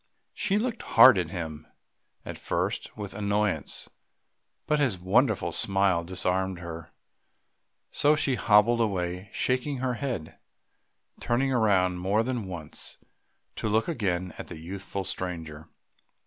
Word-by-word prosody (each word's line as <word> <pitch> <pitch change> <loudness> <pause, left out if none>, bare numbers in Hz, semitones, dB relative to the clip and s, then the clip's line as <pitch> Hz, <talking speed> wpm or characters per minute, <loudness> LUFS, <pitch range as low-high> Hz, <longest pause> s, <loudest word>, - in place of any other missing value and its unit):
She 200 0 0
looked 230 +1 -2 0.2
hard 130 -8 +10
at 85 -3 -2
him, 80 -4 -6 0.6
at - - -7
first - - -2
with 100 -2 -6
annoyance; 100 -6 -1 0.8
but 150 0 +1
his 130 -10 +1
wonderful 95 0 +2
smile 95 -1 +2
disarmed 95 +1 -1
her, 85 -1 -8 1.0
so 150 +1 +4
she 140 -3 +1
hobbled 115 0 +4
away 90 -2 -2
shaking 130 +2 0
her 125 0 -1
head, 120 - -4 0.8
turning 130 +3 +1
round 95 -7 +2
more 100 +5 +1
than 120 -4 -3
once 85 -5 -7 0.6
to 110 - -1
look 110 +2 +2
again 95 - -1
at - - -6
the 85 - -8
youthful 95 +4 -5
stranger. 80 -5 -5
100 Hz, 125 wpm, -27 LUFS, 90-120 Hz, 1.0 s, hard